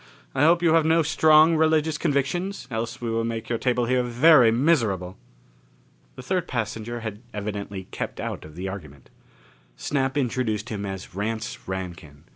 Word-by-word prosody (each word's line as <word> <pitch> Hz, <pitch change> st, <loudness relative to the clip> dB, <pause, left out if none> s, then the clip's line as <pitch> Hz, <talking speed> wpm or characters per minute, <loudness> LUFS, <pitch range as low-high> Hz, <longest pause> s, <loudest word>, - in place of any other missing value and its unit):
I 135 Hz, +2 st, +3 dB
hope 170 Hz, +2 st, +4 dB
you 165 Hz, -2 st, +4 dB
have 165 Hz, -1 st, +5 dB
no 160 Hz, +1 st, +3 dB
strong 155 Hz, +1 st, +5 dB
religious 155 Hz, -1 st, +2 dB
convictions, 170 Hz, +6 st, -1 dB
else 115 Hz, +2 st, -4 dB
we 115 Hz, -1 st, -2 dB
will 115 Hz, 0 st, 0 dB
make 115 Hz, 0 st, -4 dB
your 115 Hz, -1 st, -1 dB
table 125 Hz, -1 st, +1 dB
here 125 Hz, +1 st, +2 dB
very 125 Hz, +1 st, +5 dB
miserable!" 110 Hz, -, +1 dB, 1.0 s
The 125 Hz, -, -9 dB
third 180 Hz, +4 st, -1 dB
passenger 115 Hz, 0 st, -4 dB
had 110 Hz, -1 st, -6 dB
evidently 100 Hz, -2 st, -5 dB
kept -, -, -5 dB
out -, -, -4 dB
of 75 Hz, 0 st, -12 dB
the 95 Hz, +2 st, -5 dB
argument. 75 Hz, -8 st, -9 dB, 0.7 s
Snap 135 Hz, -1 st, -1 dB
introduced 120 Hz, -5 st, -1 dB
him 100 Hz, -2 st, -4 dB
as 95 Hz, -1 st, -7 dB
Rance 110 Hz, +3 st, -4 dB
Rankin. 85 Hz, -6 st, -7 dB
120 Hz, 160 wpm, -24 LUFS, 105-150 Hz, 1.0 s, have